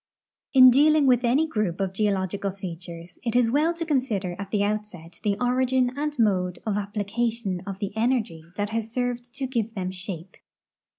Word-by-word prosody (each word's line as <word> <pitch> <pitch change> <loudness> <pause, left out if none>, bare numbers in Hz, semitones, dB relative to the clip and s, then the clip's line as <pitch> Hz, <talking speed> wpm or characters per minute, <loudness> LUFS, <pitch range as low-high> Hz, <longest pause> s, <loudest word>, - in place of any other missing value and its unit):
In 255 -2 +9
dealing 300 +3 +5
with 250 -2 +4
any 260 +6 +3
group 215 - -2
of 190 -1 -1
geological 200 -1 0
features, 175 -2 -8
it 235 -1 -2
is 240 -2 +4
well 300 +5 +3
to 335 0 -3
consider 225 - -1
at 200 -1 -5
the 205 -1 +1
outset 205 -5 -4
the 205 -2 0
origin 255 0 +1
and 295 0 -3
mode 185 -6 +1
of 215 -2 0
application 205 0 -2
of 195 -1 -4
the 200 0 -4
energy 220 -8 0
that 205 +1 -2
has 225 0 -3
served 245 0 -2
to 275 - -2
give 230 -3 -2
them 185 -2 -2
shape. 185 -1 -7
215 Hz, 175 wpm, -25 LUFS, 195-250 Hz, -, In